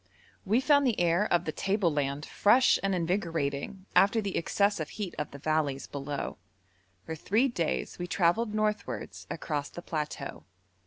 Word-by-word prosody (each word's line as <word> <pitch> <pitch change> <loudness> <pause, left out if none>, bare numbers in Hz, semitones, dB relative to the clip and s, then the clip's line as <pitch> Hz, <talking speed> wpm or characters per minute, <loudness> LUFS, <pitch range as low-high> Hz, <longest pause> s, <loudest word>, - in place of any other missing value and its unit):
We 220 +6 +3
found 285 -1 +4
the 235 - +1
air 175 +4 +2
of 175 0 +3
the 155 - -1
table 195 -1 +1
land 145 0 -1
fresh 245 +5 +4
and 195 -1 +1
invigorating 170 -1 -2
after 200 +4 +5
the 200 -3 -3
excessive 200 -2 +1
heat 205 -5 -5
of 150 - -2
the 140 - -10
valleys 145 -2 0
below. 140 -5 -5 0.7
For 160 - -4
three 215 - +2
days 175 - -2
we 175 - -3
travelled 200 +5 +1
northwards 125 - -2
across 150 -3 -3
the 175 - -9
plateau. 150 -3 -4
175 Hz, 155 wpm, -29 LUFS, 150-205 Hz, 0.7 s, after